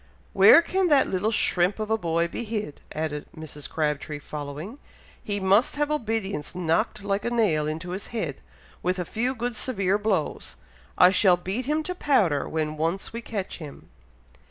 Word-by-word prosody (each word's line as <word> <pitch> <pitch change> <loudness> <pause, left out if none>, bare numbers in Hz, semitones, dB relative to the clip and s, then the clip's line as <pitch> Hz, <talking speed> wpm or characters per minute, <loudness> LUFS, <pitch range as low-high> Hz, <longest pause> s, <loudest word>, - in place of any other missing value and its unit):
"Where 335 - +8
can 375 +2 +1
that 290 -4 +4
little 195 +4 0
shrimp 185 -3 +2
of 215 0 -4
a - - +4
boy 170 -3 0
be 205 - -5
hid?" 210 -8 -4
added 155 -1 -4
Mrs. 150 -2 -7
Crabtree, 150 -1 -2
following. 150 - -7 0.4
"He 205 -1 -2
must 200 +8 +3
have 295 +1 0
obedience 220 - -2
knocked 180 +5 0
like 200 0 -1
a 240 - 0
nail 195 -11 +1
into 165 +4 -4
his 190 +2 -5
head, 230 -2 -4 0.4
with 180 +1 0
a 180 - -2
few 245 +7 -1
good 240 0 -3
severe 200 -5 0
blows. 205 -7 -1 0.4
I 180 - +7
shall 190 -2 +5
beat 195 +8 -4
him 305 +1 +1
to 360 - -3
powder 200 - +1
when 155 -1 -2
once 165 +7 -2
we 230 - -4
catch 205 -6 -5
him." 150 -4 -10
195 Hz, 175 wpm, -25 LUFS, 160-225 Hz, 0.4 s, Where